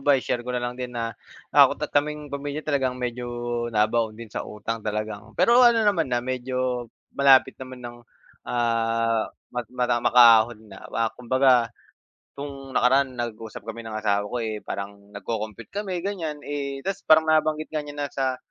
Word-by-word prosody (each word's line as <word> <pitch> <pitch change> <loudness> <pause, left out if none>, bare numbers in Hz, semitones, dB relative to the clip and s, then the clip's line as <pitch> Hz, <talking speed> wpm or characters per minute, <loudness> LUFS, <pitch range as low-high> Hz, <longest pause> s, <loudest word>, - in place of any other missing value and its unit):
ba, 140 0 +4
i-share 125 -1 -2
ko 125 - -6
na 120 - -2
lang 120 - -2
din 125 - -3
na, 115 -1 -2 0.4
ako't - - +5
at - - -8
kaming 150 0 -1
pamilya, 145 +1 -4
talagang 135 -4 0
medyo 125 0 -4 0.5
nabaon 110 +1 +2
din 115 -2 -10
sa - - -3
utang, 110 +2 -5
talagang 105 0 -4
pero 235 +1 +5
ano 235 -2 +6
naman 195 -7 +2
na, 120 -1 0
medyo, 125 -1 -2 0.3
malapit 135 -1 +5
naman 130 -1 -9
nang, 120 0 -7 0.5
ah, 115 -1 +1 0.2
mag-mada 125 0 -1
makaahon 115 -2 +6
na. - - -12
Wa 115 -1 -1
kumbaga, 125 -1 +3 0.7
'tong 140 -1 -7
nakaraan, 130 +1 +3
nag-usap 115 -3 -6
kami 115 +1 -6
ng 110 -1 -6
asawa 105 -1 0
ko, 125 - -4
eh, 110 -1 -3
parang 100 0 -7
nagko-compute 110 +2 -5
kami, 190 -4 -3
ganiyan, 170 -7 -3
eh 140 -1 -4
tapos 195 0 -2
parang 160 0 +7
nabanggit 155 0 +1
nga 155 - 0
niya 145 0 -9
na 145 -1 -2
sa, 130 -1 -1
125 Hz, 170 wpm, -25 LUFS, 115-140 Hz, 0.7 s, parang